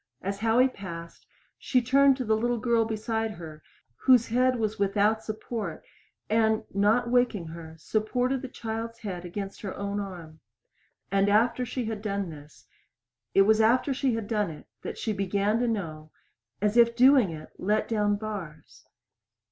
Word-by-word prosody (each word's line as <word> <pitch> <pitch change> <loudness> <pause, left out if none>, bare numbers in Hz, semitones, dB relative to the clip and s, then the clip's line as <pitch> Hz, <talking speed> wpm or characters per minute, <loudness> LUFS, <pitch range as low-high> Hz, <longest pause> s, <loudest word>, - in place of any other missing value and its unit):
As 200 +1 -3
Howie 230 +4 +4
passed, 170 -8 -9 0.3
she 255 - +2
turned 270 +2 +4
to 255 - -3
the 220 0 +2
little 240 +2 0
girl 230 0 +2
beside 220 0 -2
her 160 -3 -10 0.4
whose 250 -3 +4
head 255 +2 +3
was 220 -3 -2
without 205 +2 +2
support 215 -5 -5 0.4
and, 220 0 +2
not 220 +5 +2
waking 240 -9 +1
her, 160 -1 -9
supported 245 +8 -1
the 265 - -5
child's 230 -1 -5
head 180 -5 -5
against 195 +2 -6
her 195 -3 -5
own 200 0 -3
arm. 175 -5 -8 0.7
And 195 +1 +3
after 235 +4 +2
she 250 +1 -3
had 220 -2 -4
done 200 -4 -2
this 150 -1 -14 0.7
it 195 - +7
was 220 +2 +4
after 250 +5 +3
she 260 -2 0
had 225 -2 -4
done 210 -4 0
it 155 - -10 0.2
that - - -6
she 220 - -2
began 200 +2 0
to 245 - +1
know, 160 -9 -4 0.5
as 210 +2 +2
if 235 0 +5
doing 255 -3 +6
it 155 -1 -8
let 210 +3 +1
down 210 -2 +1
bars. 200 -8 -8
215 Hz, 165 wpm, -27 LUFS, 195-235 Hz, 0.7 s, it